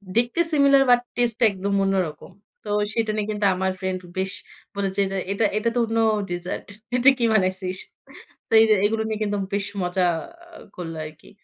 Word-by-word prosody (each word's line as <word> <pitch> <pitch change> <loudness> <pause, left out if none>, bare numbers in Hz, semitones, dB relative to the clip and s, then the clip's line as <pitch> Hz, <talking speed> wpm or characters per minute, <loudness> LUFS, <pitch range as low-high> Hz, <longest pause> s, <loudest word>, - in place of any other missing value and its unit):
দেখতে 240 +7 +1
similar 280 -2 +5
but 245 0 +6
টেস্টে 240 -2 0
টা - - +2
একদম 200 +1 -3
অন্যরকম। 185 -4 -2 0.3
তো 210 - -8 0.2
সেটা 225 -2 0
নিয়ে 210 -1 -2
কিন্তু 210 -1 -1
আমার 190 0 0
ফ্রেন্ড 185 -1 -2 0.2
বেশ 190 0 -1 0.4
বলেছে, 200 0 -1 0.3
"এটা 210 +2 +1
এটা 215 +2 +1
তো - - +2
অন্য 225 0 -2 0.3
ডেজার্ট। 175 +1 -5 0.3
এটা 250 +2 +6
কি 240 - -2
বানাইছিস?" 185 -2 0 0.7
তো - - -5
এরা 220 -1 +4
এগুলো 220 +1 +1
নিয়ে 220 -1 -3
কিন্তু 205 -1 -1 0.2
বেশ 200 -1 0 0.2
মজা 180 +1 0 0.5
আ - - -13 0.2
করল 165 -2 -6
আরকি। 155 0 -13
200 Hz, 175 wpm, -23 LUFS, 185-225 Hz, 0.7 s, but